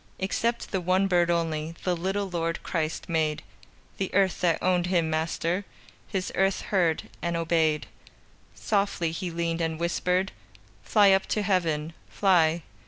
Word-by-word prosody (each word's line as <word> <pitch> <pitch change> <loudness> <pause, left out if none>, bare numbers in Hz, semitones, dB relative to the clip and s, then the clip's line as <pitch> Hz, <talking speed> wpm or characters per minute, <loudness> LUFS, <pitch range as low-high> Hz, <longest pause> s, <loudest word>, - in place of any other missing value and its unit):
Except 230 +5 -1
the 190 - 0
one 185 +2 +2
bird 175 -2 +2
only 165 -1 -1
The 180 -1 +1
little 195 +4 -2
Lord 165 -2 -2
Christ 160 -2 -2
made; 160 -3 0 0.6
The 195 - -2
earth 195 -2 +2
that 170 -3 +3
owned 180 -1 +1
Him 170 -3 +1
Master, 165 +4 -1 0.4
His 190 -3 -3
earth 195 0 +1
heard 175 -5 +1 0.2
and 170 0 -1
obeyed. 160 -2 +1 0.7
Softly 200 -5 0
He 175 +2 -4
leaned 170 0 -2
and 160 -1 -2
whispered: 180 +2 0 0.5
"Fly 205 -2 +5
up 190 0 +3
to 210 - 0
Heaven! 165 -5 0 0.2
Fly!" 170 -4 +3
175 Hz, 145 wpm, -27 LUFS, 165-190 Hz, 0.7 s, Fly